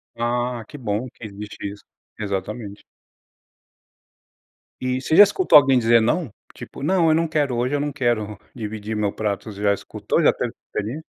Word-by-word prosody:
Ah, 120 0 -1
que 145 - -10
bom 115 -1 -2
que 115 - -12
existe 105 0 -8
isso. 100 - -13 0.4
Exatamente. 100 +1 -4 2.0
E 130 0 -1
você 155 - 0
já 205 - +11
escutou 205 - +5
alguém 135 -2 +5
dizer 115 0 +4
"não"? 145 +4 0 0.2
Tipo, - - -10
"não, 170 0 +3
eu 155 - +4
não 165 +1 +1
quero. 145 -5 0
Hoje 125 +4 0
eu - - 0
não 145 +1 -2
quero 110 -6 -1 0.2
dividir 110 -2 -5
o 105 - -2
meu 100 -1 +1
prato". 105 0 -3
Você 100 0 -9
já 100 -1 +3
escutou - - -2
já - - +6
teve - - -2
essa - - -18
experiência? 120 +10 -4
120 Hz, 185 wpm, -22 LUFS, 105-140 Hz, 2.0 s, já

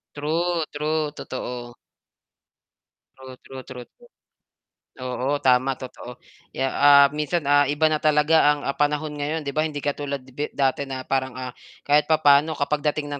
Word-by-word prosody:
True, 165 +3 -1
true, 150 0 -2
totoo. 125 -4 -7 1.4
True, 130 -1 -11
true, 130 -1 -11
true, 125 -1 -10
true. 485 0 -21 0.9
Oo, 130 +2 -2
tama 130 +1 +3
totoo. 125 -1 -10 0.4
Kaya, 135 - 0
ah, 140 0 +7
minsan, 150 +2 -2
ah, 145 0 +3
iba 150 +2 +2
na 155 - +1
talaga 150 +1 +3 0.2
ang, 145 - -6
ah, - - -1
panahon 150 +1 0
ngayon 150 +2 -3
'di 140 - -4
ba 155 +2 0
hindi 145 -2 -6
katulad 140 -1 -3
bi 135 +3 -5
dati 135 0 0
na 130 -1 -5
parang, 130 -1 -2
ah, 130 -1 -6 0.3
kahit 150 +1 +3
papaano 155 0 +4
kapag 145 +1 -1
dating 145 -1 -5
ng 145 - -4
145 Hz, 160 wpm, -23 LUFS, 130-150 Hz, 1.4 s, ah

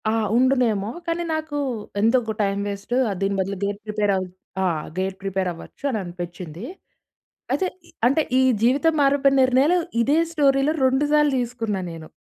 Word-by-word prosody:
ఆ! - - +2 0.2
ఉండునేమో. 240 -5 +2 0.2
కానీ, 335 +1 -1
నాకు 315 -1 -4 0.4
ఎందుకు 225 +1 +2
టైం 200 -1 0
వేస్టు. 200 +4 -4 0.3
దీని 195 0 +1
బదులు 195 +1 -2
గేట్ 200 0 -2
ప్రిపేర్ 210 -1 0
అవు 185 -1 -2 0.4
ఆహ్. 160 -4 -1
గేట్ 190 0 -1
ప్రిపేర్ 190 -1 -1
అవ్వచ్చు 165 - -12
అని 240 - -1
అనిపించింది. 175 0 -7 0.9
అయితే 380 - +1 0.2
ఈ - - -19 0.2
అంటే 275 +5 +3 0.2
ఈ - - +5 0.2
జీవితం 280 +7 +3
మారిపోయిన 275 0 +3
నిర్ణయాలు 265 +7 +4 0.2
ఇదే 280 +6 +3
స్టోరీలో 280 -2 +3
రెండు 265 +3 +2
సార్లు 300 -1 +4
తీసుకున్నా 230 -4 -2
నేను. 165 -1 -9
230 Hz, 150 wpm, -23 LUFS, 195-275 Hz, 0.9 s, ఈ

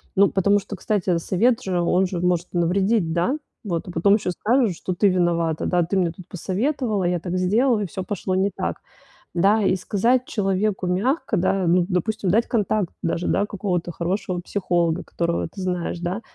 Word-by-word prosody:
Ну, 200 +1 +5
потому 200 +2 +3
что, 200 - -7
кстати, 190 -3 0
совет 225 +8 +1
же, 180 -2 0
он 180 +2 +2
же 180 -1 -4
может 180 -1 +1
навредить, 185 +1 +1
да? 175 - +1 0.3
Вот, 175 -4 -3
а - - -6
потом 190 +4 +4
еще 200 -4 -1
скажут, 225 +2 +1
что 185 - -4
ты 200 +3 +3
виновата, 170 -3 +1
да. 175 -1 +2
Ты 185 +4 -1
мне 175 -3 +1
тут 175 +1 -13
посоветовала, 210 - -1
я 175 0 +1
так 180 +2 -3
сделала, 220 +6 +2
и 200 - -2
всё 185 +3 -5
пошло 185 0 -2
не 195 +2 +1
так. - - -2 0.6
Да, 200 +5 +3
и 195 - +2
сказать 230 +7 +1
человеку 195 -2 -1
мягко, 220 - 0
да, 185 +1 +1
ну, 175 +1 +3
допустим, 195 +1 -1
дать 225 +4 +2
контакт 210 -4 0
даже, 170 +1 -1
да, 205 - +2
какого-то 185 -4 -2
хорошего 180 +2 -2
психолога, 175 -2 0
которого 170 0 -2
ты 195 - -9
знаешь, 180 -2 -2
да. 180 +6 -3
185 Hz, 185 wpm, -23 LUFS, 175-205 Hz, 0.6 s, Ну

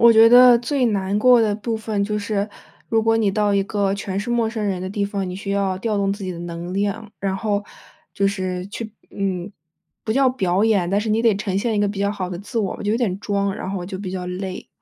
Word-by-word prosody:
我 235 0 +8
觉 225 0 +8
得 245 0 +8
最 255 +1 0
难 200 -2 0
过 245 +2 +6
的 215 -2 +2
部 225 +2 -3
分 215 -2 -2
就 210 +1 -1
是， 205 0 -2 0.4
如 225 -1 +2
果 225 0 +3
你 215 -3 +2
到 205 0 +1
一 200 - +3
个 200 -1 0
全 195 -1 -4
是 210 +4 -3
陌 235 -2 +2
生 220 -1 -3
人 190 -3 -1
的 185 - -4
地 200 +1 -1
方， 200 -2 -3
你 180 - -5
需 195 0 -5
要 200 -2 0
调 215 0 -1
动 195 -1 +1
自 200 0 -6
己 185 - -3
的 170 - -8
能 170 +1 -6
量， 205 +2 -2
然 195 -1 -1
后 205 -1 -1 0.5
就 200 - +2
是 185 -2 -2
去 220 +1 -6 0.2
嗯， 195 -1 -3 0.5
不 220 - 0
叫 265 +2 +4
表 195 -5 +1
演， 200 -6 +2
但 200 +3 +1
是 220 - -3
你 220 +1 +2
得 230 -3 +3
呈 195 -2 -2
现 225 +2 0
一 - - +2
个 205 - +3
比 200 0 -4
较 200 0 +1
好 190 -3 -4
的 175 - -5
自 205 +5 -4
我， 200 -4 -2
就 210 0 0
有 - - +2
点 210 -6 -1
装， 200 -2 -1
然 190 - -5
后 195 - -2
我 175 - -5
就 190 0 -6
比 190 -2 -5
较 180 -1 -4
累。 185 +1 -5
200 Hz, 285 characters per minute, -21 LUFS, 190-220 Hz, 0.5 s, 我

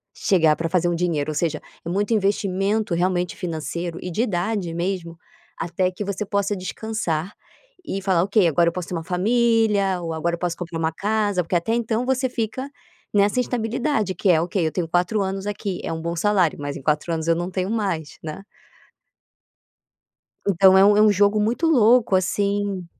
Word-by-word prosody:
chegar 160 -5 +3
pra 165 +1 -3
fazer 175 0 +1
um 175 - 0
dinheiro, 165 -4 -1
ou - - -6
seja, 155 0 -1 0.3
é - - -3
muito 205 +5 0
investimento 200 0 0
realmente 180 0 0
financeiro 170 0 -4
e 180 - -5
de 195 - -1
idade 190 -4 -1
mesmo, 170 -1 -3 0.4
até 175 +2 0
que 195 +3 -6
você 200 +1 -3
possa 200 0 0
descansar 185 -3 -3 0.5
e 195 - -3
falar: 190 -3 +2
"Ok 200 -1 +3
agora 170 +2 +3
eu - - -9
posso 180 -1 -5
ter - - -5
uma 165 - -3
família 210 0 +2
ou 165 -1 -4
agora 170 +2 -1
eu - - -14
posso 175 -1 -2
comprar 170 -2 -5
uma 160 0 0
casa", 205 -1 0
porque 170 +2 -3
até 175 +7 +1
então 235 0 0
você 260 0 0
fica 245 +3 -3 0.4
nessa 205 +3 +3
instabilidade 235 -2 -1
que 195 - 0
é: 165 -3 +5
"Ok, 170 +1 -1
eu 160 - 0
tenho 175 -1 -2
4 180 +6 +1
anos 195 +1 -4
aqui, 200 -2 -4
é - - -3
bom 165 +1 -3
salário." 185 -2 +2
Mas 145 0 -4
em - - -9
4 150 +3 0
anos 160 0 -3
eu 165 - +4
não 175 +2 -3
tenho 185 +2 -2
mais, 190 -9 -2
né. 155 +4 -6 2.0
Então 190 0 +6
é - - +7
é 205 +1 +6
um 215 -1 +6
jogo 205 +1 +3
muito 230 +10 0
louco 240 -8 +4
assim 200 0 0
190 Hz, 190 wpm, -22 LUFS, 170-210 Hz, 2.0 s, é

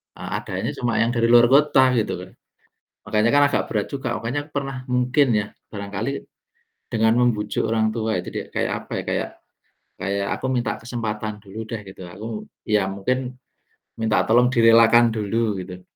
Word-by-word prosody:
e - - -13
adanya - - -3
cuma 120 -2 -1
yang 115 - 0
dari 115 0 +2
luar 120 0 +7
kota, 140 -2 +5
gitu 110 -5 0
loh. 90 +1 -10 0.8
Makanya 110 +2 +3
kan 145 0 +6
agak - - +1
berat 105 -2 -1
juga, 135 -4 -3
pokoknya 140 +6 -3
pernah 135 -2 -4
mungkin 125 +3 +3
ya, 105 - -1 0.3
barangkali 100 +4 -4 0.8
dengan 110 0 +3
membujuk 115 -4 +1
orang 110 -1 +1
tua 110 -2 -1
itu - - -10
di - - -3
kayak - - 0
apa - - -12
ya, - - -14
kayak - - -1 0.7
kayak 100 0 -2
aku - - -6
minta 125 -2 -1
kesempatan 110 -3 -4
dulu 100 +3 -9
deh 110 -2 -5
gitu, 95 -1 -10
aku 115 - -7 0.2
ya 105 -2 +2
mungkin 125 +6 -2 0.6
minta 110 -1 +2
tolong 120 +2 +5
direlakan 115 0 +6
dulu 110 -1 -1
gitu, 90 0 -10
115 Hz, 165 wpm, -22 LUFS, 105-125 Hz, 0.8 s, luar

